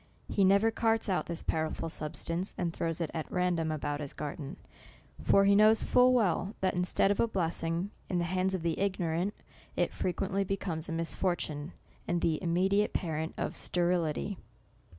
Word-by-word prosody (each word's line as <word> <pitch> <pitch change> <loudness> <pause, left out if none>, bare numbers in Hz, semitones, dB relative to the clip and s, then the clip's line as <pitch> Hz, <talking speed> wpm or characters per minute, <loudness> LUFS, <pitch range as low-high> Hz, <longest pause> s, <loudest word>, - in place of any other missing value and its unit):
He 200 - +1
never 200 +4 +5
carts 225 -1 +1
out 185 - 0
this 170 -1 -2
powerful 160 +1 -1
sub 155 -1 -5
stance, 175 +4 -3
and 170 -2 -1
throws 165 0 -2
it 165 - -2
at 160 -2 -4
random 175 -3 +1
about 145 -1 -2
his 145 -2 -5
garden; 145 -1 -6 0.7
tor 195 0 +6
he 200 0 +5
knows 215 +2 +6
full 250 0 +5
well, 210 -3 +1
that 190 -1 +1
instead 180 +2 +2
of 205 - -1
a 230 - +4
blessing, 170 -1 -1 0.2
in 180 - 0
the 175 - +1
hands 185 +2 0
of 175 - -4
the 165 -2 -1
ignorant, 185 0 0 0.4
it - - 0
frequently 195 +2 -1
becomes 180 -5 -3
a - - -3
misfortune, 165 -1 -2 0.3
and 175 -1 0
the 160 -2 +2
im 170 0 -2
mediate 195 +4 +2
parent 160 -2 -2
of - - -2
sterility. 175 +1 0
180 Hz, 175 wpm, -31 LUFS, 165-195 Hz, 0.7 s, tor